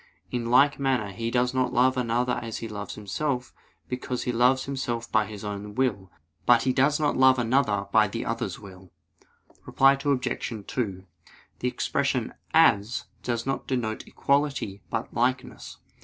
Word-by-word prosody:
In 120 -2 -2
like 140 +4 +5
manner 130 -7 0
he 115 +4 -3
does 125 +1 +1
not 130 -1 +1
love 130 +1 +4
another 125 0 0
as 115 -2 -5
he 115 - -5
loves 105 -1 -6
himself, 125 +5 -3 0.3
because 125 0 -3
he 125 - -1
loves 125 +2 +3
himself 120 -4 -3
by 110 -1 +2
his 105 -1 -9
own 105 0 -6
will; 105 -8 -1 0.4
but 120 -1 +6
he 130 - +1
does 140 +4 +3
not 150 -1 +1
love 130 0 +5
another 115 -4 +1
by 110 0 +5
the - - -4
other's - - -3
will. 95 -2 -13 0.7
Reply 135 +1 +4
Obj. 125 -6 -2
2: 95 -7 -3 0.5
The - - -1
expression - - -1 0.2
"as" 105 +3 +3 0.2
does 120 -1 -2
not 135 0 -3
denote 115 -4 -2
equality, 140 -9 0
but 115 - -3
likeness. 125 +2 -2
120 Hz, 155 wpm, -26 LUFS, 105-130 Hz, 0.7 s, but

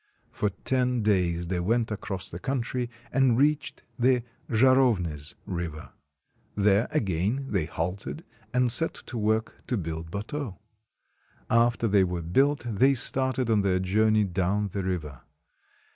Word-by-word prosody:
For 105 - 0
ten 125 +4 0
days 85 -5 +1
they 90 -1 0
went 110 +5 0
across 100 -3 -3
the 85 - -6
country, 125 0 -2 0.2
and 130 -3 +3
reached 145 +1 +1 0.2
the 125 0 +3 0.3
Zharovnys 110 - +2
River. 85 -4 -5 0.6
There 100 +2 +3
again 105 - 0
they 95 -7 +1
halted, 90 - -4 0.3
and 125 -1 +2
set 165 +6 +3
to 120 - -8
work 110 +1 -1
to 125 - 0
build 80 -2 -5
bateaux. 105 - -5 0.9
After 115 0 +3
they 100 -2 +4
were 90 -2 -2
built 135 - +2
they 130 +5 +3
started 130 -1 0
on 105 -2 +4
their 95 -2 +2
journey 105 +3 +3
down 100 +2 0
the 100 +1 -3
river. 80 -8 -4
105 Hz, 135 wpm, -27 LUFS, 90-125 Hz, 0.9 s, they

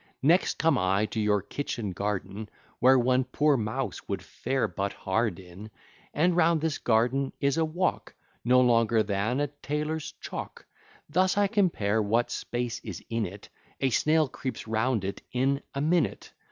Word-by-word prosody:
Next 170 +6 +3
come 165 0 +3
I 95 +3 +2
to 110 - -4
your 105 -2 +2
kitchen 115 -3 -4
garden, 100 +2 -4 0.3
Where 130 +2 +6
one 130 +1 +3
poor 145 +3 +2
mouse 110 -3 -3
would - - -3
fare 130 +1 -2
but 100 0 -3
hard 100 -1 -1
in; 95 +4 -11 0.4
And 175 +4 +2
round 170 -1 +4
this 155 -1 -1
garden 125 +4 +1
is 140 -1 +1
a 165 - +3
walk 175 +4 -2 0.3
No 125 +1 +5
longer 115 -2 +3
than 105 +5 -1
a 145 - +2
tailor's 150 +2 -4
chalk; - - -7 0.4
Thus 185 +5 +2
I 205 - +4
compare 170 - +1
what 115 +3 +1
space 120 -1 -3
is - - -7
in 115 -3 0
it, 100 +3 -11 0.3
A 135 -1 +1
snail 155 +5 +3
creeps 130 -2 -6
round 110 0 0
it 100 - -4
in 135 +3 +1
a 140 - -1
minute. 165 +3 0
125 Hz, 165 wpm, -28 LUFS, 105-150 Hz, 0.4 s, Where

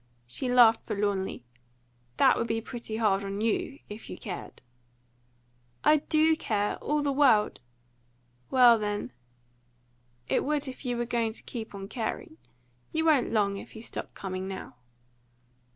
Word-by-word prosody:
She 245 - -2
laughed 235 -2 +6
forlornly. 200 - -1 0.7
"That - - +6
would 230 - -1
be 225 0 0
pretty 225 -1 -6
hard 200 -3 +2
on 195 0 -4
you, 230 +5 -1
if 210 +2 -9
you - - -6
cared." 185 -4 -7 1.2
"I 305 - +6
do 315 +2 +3
care 210 -9 -1
all 300 0 -1
the 285 - +1
world!" 265 -7 +4 0.9
"Well, 245 -3 +6
then, 205 - -3 1.2
it - - +1
would 295 0 -1
if 260 +1 -8
you 245 -1 -1
were 240 - -1
going 230 -2 -1
to - - -12
keep 220 -3 -7
on 195 0 -6
caring. 255 +8 -5 0.5
You 320 0 0
won't 300 -6 +3
long, 200 -3 +1
if - - -10
you 220 - -9
stop - - -7
coming 185 -1 -4
now." 190 -1 -7
225 Hz, 150 wpm, -28 LUFS, 205-265 Hz, 1.2 s, laughed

